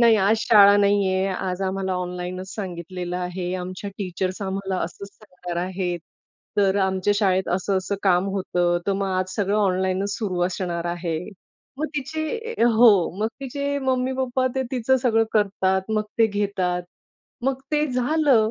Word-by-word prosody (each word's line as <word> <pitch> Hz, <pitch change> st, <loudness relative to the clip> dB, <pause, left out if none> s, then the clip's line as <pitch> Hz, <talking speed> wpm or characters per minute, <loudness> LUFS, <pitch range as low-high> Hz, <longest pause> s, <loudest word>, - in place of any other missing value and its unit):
नाही, 230 Hz, -2 st, +6 dB
आज 205 Hz, +2 st, +3 dB
शाळा 205 Hz, -2 st, +7 dB
नाहीये, 200 Hz, -2 st, +2 dB
आज 185 Hz, 0 st, -3 dB
आम्हाला 190 Hz, 0 st, -1 dB
ऑनलाइनचं 180 Hz, 0 st, -4 dB
सांगितलेलं 180 Hz, -2 st, -5 dB
आहे, 180 Hz, 0 st, -3 dB
आमच्या 185 Hz, +2 st, -6 dB
टीचर्स 185 Hz, 0 st, -3 dB
आम्हाला 190 Hz, -1 st, -2 dB
असंच 200 Hz, +4 st, -8 dB
सांगणार 180 Hz, -4 st, -9 dB
आहेत. 185 Hz, -1 st, -2 dB, 0.6 s
तर 200 Hz, -1 st, +3 dB
आमच्या 190 Hz, +1 st, +1 dB
शाळेत 190 Hz, -3 st, +2 dB
असं, 190 Hz, +1 st, 0 dB
असं 195 Hz, +2 st, -3 dB
काम 185 Hz, -1 st, +3 dB
होतं, 175 Hz, -2 st, 0 dB
तर 200 Hz, -, +2 dB
मग 195 Hz, 0 st, -1 dB
आज 185 Hz, 0 st, -2 dB
सगळं 205 Hz, 0 st, +1 dB
ऑनलाइनचं 190 Hz, -1 st, +1 dB
सुरू 190 Hz, -5 st, -2 dB
असणार 175 Hz, -2 st, -3 dB
आहे. 170 Hz, -2 st, -2 dB, 0.6 s
मग 310 Hz, -, 0 dB
तिचे 315 Hz, -, -3 dB, 0.2 s
हो 235 Hz, +1 st, +8 dB, 0.3 s
मग 220 Hz, -, +2 dB
तिचे 280 Hz, +1 st, -2 dB
मम्मी-पप्पा 260 Hz, -1 st, 0 dB
ते 265 Hz, -, 0 dB
तिचं 260 Hz, +1 st, +2 dB
सगळं 225 Hz, -2 st, +3 dB
करतात, 190 Hz, -2 st, +2 dB
मग 215 Hz, -1 st, +1 dB, 0.2 s
ते 225 Hz, -, +6 dB
घेतात. 200 Hz, -4 st, -1 dB, 0.6 s
मग 265 Hz, 0 st, 0 dB
ते 300 Hz, 0 st, +2 dB
झालं 255 Hz, -3 st, +2 dB
195 Hz, 150 wpm, -23 LUFS, 185-225 Hz, 0.6 s, हो